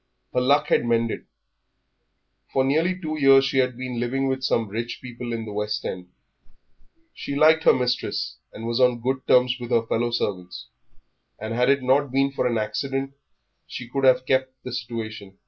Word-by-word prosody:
Her 125 - +2
luck 140 +3 +3
had - - +3
mended; 115 -1 -1 1.2
for 135 - +2
nearly 165 +7 +1
two 155 -3 -4
years 135 -1 +6
she 135 -1 +1
had 125 -2 +1
been 125 -2 -4
living 135 +3 -1
with 130 0 -1
some 115 -3 0
rich 115 +4 -5
people 120 -1 -7
in 115 -1 -3
the 105 - -7
West 105 0 -3
End; 90 -1 -5 1.0
she 140 - -5
liked 160 +2 +4
her - - +7
mistress 125 -1 -2
and 115 - -8
was 115 +1 -1
on 125 -2 +3
good 130 +2 -2
terms 125 0 +4
with 120 -1 -7
her 115 -2 +2
fellow 120 +1 0
servants, 90 -6 -4 0.7
and 110 +1 -5
had 125 +2 +2
it 140 -1 +3
not 135 +2 +2
been 135 +1 +2
for 130 -2 0
an 120 -2 0
accident 135 +6 -2 0.5
she 125 - -7
could 135 +3 -3
have 130 -1 +4
kept 130 0 +1
this 125 -1 -4
situation. 110 -4 -7
125 Hz, 180 wpm, -24 LUFS, 115-135 Hz, 1.2 s, her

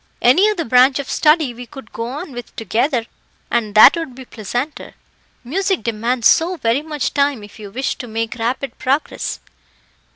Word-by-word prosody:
Any 350 - +5
other 370 -6 -2
branch 255 +3 +5
of 280 -2 -4
study 300 -4 +2
we 245 +1 -10
could 270 -5 -12
go 230 - -4
on 290 +6 -6
with 245 -1 -9
together, 235 - 0 0.5
and 220 -3 -1
that 215 - +9
would 325 -7 -5
be 260 0 -10
pleasanter. 245 +7 -5 0.5
Music 380 +8 -1
demands 230 +1 +1
so 345 +2 +3
very 235 0 +1
much 300 -2 -3
time 280 -5 +1
if 205 +1 -13
you 205 -2 -8
wish 255 +7 -2
to 245 - -7
make 225 0 -3
rapid 250 +4 -3
progress." 275 +4 -1
255 Hz, 170 wpm, -19 LUFS, 230-295 Hz, 0.5 s, that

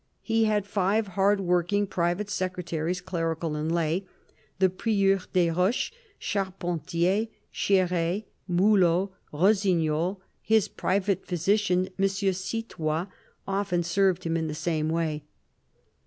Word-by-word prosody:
He 225 -1 +2
had 210 -2 +1
five 200 +1 +1
hard 195 +2 +2
worked 180 -1 +1 0.2
private 175 +4 0
secretaries, 180 -2 -2
clerical 165 -3 -2
and 155 +2 -2
lay: 170 +3 0 0.5
the 190 0 +5
Prieur 195 0 +2
des 175 -2 +3
Roches, 180 - +1 0.3
Charpentier, 185 0 -1 0.2
Chere, 180 0 +1 0.3
Mulot, 185 0 +3 0.2
Rossignol; 180 -1 +2 0.2
his 220 -2 +3
private 195 +1 -1
physician, 185 +1 +1
M. 195 - +4
Citoys, 190 -3 -2 0.4
often 195 -3 0
served 185 +1 +2
him 165 0 -1
in 160 -1 -1
the 150 - -4
same 155 0 -1
way. 160 -2 -1
185 Hz, 110 wpm, -27 LUFS, 170-195 Hz, 0.5 s, the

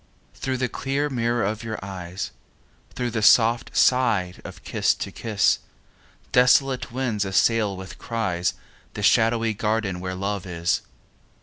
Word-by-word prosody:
Through 130 -1 -3
the 130 0 0
clear 140 +4 -2
mirror 120 -1 0
of 110 +2 -2
your 110 -1 -4
eyes, 90 -1 -6 0.6
Through 125 -1 -2
the 110 -1 -2
soft 115 +2 +4
sigh 115 -8 +3
of - - -10
kiss - - +1
to - - -5
kiss, 110 -3 +1 0.7
Desolate 125 +1 +3
winds 120 -5 -1
assail 100 +1 +2
with 95 0 -9
cries 95 -7 -1 0.4
The 105 - -4
shadowy 115 +1 +3
garden 105 -3 -1
where 95 0 -4
love 100 0 -3
is. 85 -1 0
110 Hz, 135 wpm, -24 LUFS, 95-120 Hz, 0.7 s, soft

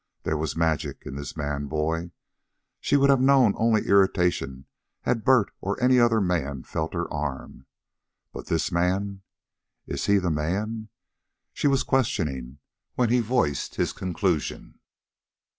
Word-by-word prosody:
There 80 - -1
was 75 -1 -2
magic 80 -3 -1
in - - -6
this 70 +2 -7
man 70 -1 -3
boy. 80 +3 -2 0.7
She 145 - +2
would 140 0 +5
have 135 -2 +3
known 130 -5 +5
only 110 -1 +2
irritation 90 -9 +2 0.4
had 115 -3 -1
Bert 125 -5 +4
or 100 +1 -2
any 125 0 +4
other 120 -2 +4
man 80 -9 -1
felt 80 +2 -4
her 85 0 -1
arm. 75 -2 -5 0.7
But - - -8
this 85 +2 0
man! 95 +3 0 0.6
IS - - -4
HE 100 - +5
THE 90 -3 0
MAN? 105 +9 -2 0.6
she - - 0
was 135 -2 +2
questioning, 75 - -1 0.4
when 125 -2 +2
he 125 - +4
voiced 115 - 0
his - - -1
conclusion. 90 -3 -2
90 Hz, 140 wpm, -25 LUFS, 75-115 Hz, 0.7 s, would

